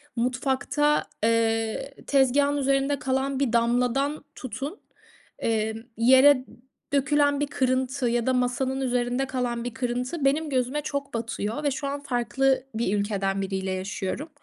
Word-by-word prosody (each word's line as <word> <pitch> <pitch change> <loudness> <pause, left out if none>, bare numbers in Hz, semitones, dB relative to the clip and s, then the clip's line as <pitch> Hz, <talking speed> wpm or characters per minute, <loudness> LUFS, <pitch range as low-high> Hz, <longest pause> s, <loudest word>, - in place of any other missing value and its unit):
mutfakta, 265 +4 +1 0.2
eee, 225 +3 +1
tezgâhın 280 +1 +3
üzerinde 275 0 +1
kalan 265 +1 -1
bir 265 -4 0
damladan 245 +5 +1
tutun, 270 - -6 0.6
emm, 220 -1 0 0.2
yere 260 +3 +6 0.5
dökülen 285 +1 +3
bir 290 - 0
kırıntı 260 -1 0
ya 235 0 0
da 260 - +3
masanın 255 +2 0
üzerinde 250 +1 0
kalan 245 -2 -2
bir 245 -1 -4
kırıntı, 250 +5 -2
benim 300 +3 +2
gözüme 260 +2 0
çok 280 -2 -4
batıyor 230 +2 -3
ve 285 - +2
şu 280 +2 -3
an 280 +1 -3
farklı 255 +1 +1
bir 210 -3 0
ülkeden 195 -1 -1
biriyle 190 -1 -2
yaşıyorum. 190 - -4
255 Hz, 135 wpm, -26 LUFS, 235-275 Hz, 0.6 s, yere